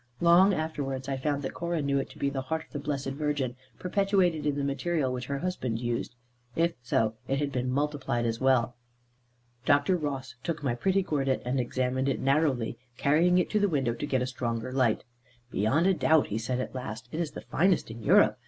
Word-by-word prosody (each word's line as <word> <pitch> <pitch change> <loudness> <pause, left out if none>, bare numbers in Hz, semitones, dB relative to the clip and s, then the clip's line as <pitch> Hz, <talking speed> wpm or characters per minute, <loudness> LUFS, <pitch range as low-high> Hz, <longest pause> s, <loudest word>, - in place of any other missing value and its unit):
Long 175 +3 +6
afterwards 140 -6 -3
I 135 - -1
found 145 +1 -1
that 130 - -3
Cora 170 -1 -2
knew 140 -1 +1
it - - -4
to - - -14
be 140 - 0
the 135 -1 -2
heart 160 +4 -3
of - - -31
the 145 - -4
Blessed 140 -1 -2
Virgin, 140 -3 -1 0.2
perpetuated 185 -5 +1
in 145 - +1
the 140 - -1
material 140 0 0
which 125 -1 -4
her 140 - -2
husband 135 -9 -2
used. 120 0 -3 0.4
If 170 +1 +2
so, 115 -2 +1
it 135 - +1
had 145 0 -1
been 125 -1 -1
multiplied 135 -3 -1
as 115 +1 -2
well. 130 -2 +3 0.9
Dr. 145 +4 +3
Ross 135 -6 -3
took 165 -4 -3
my 130 -4 +1
pretty 190 +10 +1
gordit, 135 -6 0
and 130 +2 0
examined 130 +2 0
it 135 - -1
narrowly, 135 -5 +1 0.2
carrying 165 +5 +4
it 180 - +1
to 215 - +2
the 205 -1 +3
window 135 -7 +1
to 120 - -4
get 130 -3 +1
a - - 0
stronger 120 -2 -3
light. 130 -5 +2 0.5
"Beyond 110 - +2
a 190 - +5
doubt," 160 -3 +3
he 105 - -1
said 125 +3 -2
at 130 - -4
last, 125 -2 -6
"it 155 - -4
is 165 -3 -2
the - - -7
finest 180 -7 +1
in 115 +1 -8
Europe. 105 - +5
140 Hz, 210 wpm, -28 LUFS, 125-160 Hz, 0.9 s, Long